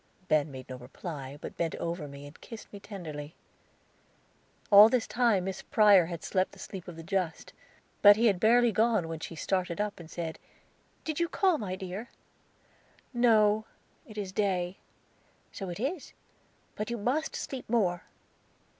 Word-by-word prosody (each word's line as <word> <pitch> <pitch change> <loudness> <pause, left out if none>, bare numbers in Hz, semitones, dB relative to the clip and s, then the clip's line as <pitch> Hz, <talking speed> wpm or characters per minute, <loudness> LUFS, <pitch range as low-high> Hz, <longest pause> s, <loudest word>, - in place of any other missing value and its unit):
Ben 155 -1 +2
made 130 -2 -9
no 130 - -7
reply, 135 +2 -7
but - - -8
bent 165 -1 -1
over 170 -2 -4
me 140 0 -10
and 145 +2 -13
kissed 225 -3 -11
me 200 - -8
tenderly. 160 -7 -8 1.4
All 205 +2 +10
this 245 -1 +1
time 235 -6 +2
Miss 190 0 -4
Prior 205 -6 +5
had 170 -2 -6
slept 185 -1 0
the - - -14
sleep 190 -3 -8
of 175 - -8
the 165 - -9
just; 180 -2 -2 0.5
but 205 0 +9
he 230 +3 +2
had 200 -5 +3
barely 235 +3 +5
gone 220 -5 +2
when 165 -1 -5
she 165 - -7
started 180 +1 -1
up 210 -2 -2
and 165 -2 -11
said, 165 -1 -5 0.6
"Did 315 -1 -3
you 340 0 +1
call, 370 0 +2
my 190 -4 -3
dear?" 190 +4 -6 1.0
"No, 220 -3 +4 0.4
it 215 -2 -12
is 200 -3 -4
day." 185 -2 -1 0.7
"So 195 -2 -6
it 175 - -6
is; 285 +6 -3 0.6
but 210 +1 -4
you 235 - -2
must 260 +9 -1
sleep 260 -4 -6
more." 190 -7 +1
195 Hz, 165 wpm, -29 LUFS, 170-220 Hz, 1.4 s, All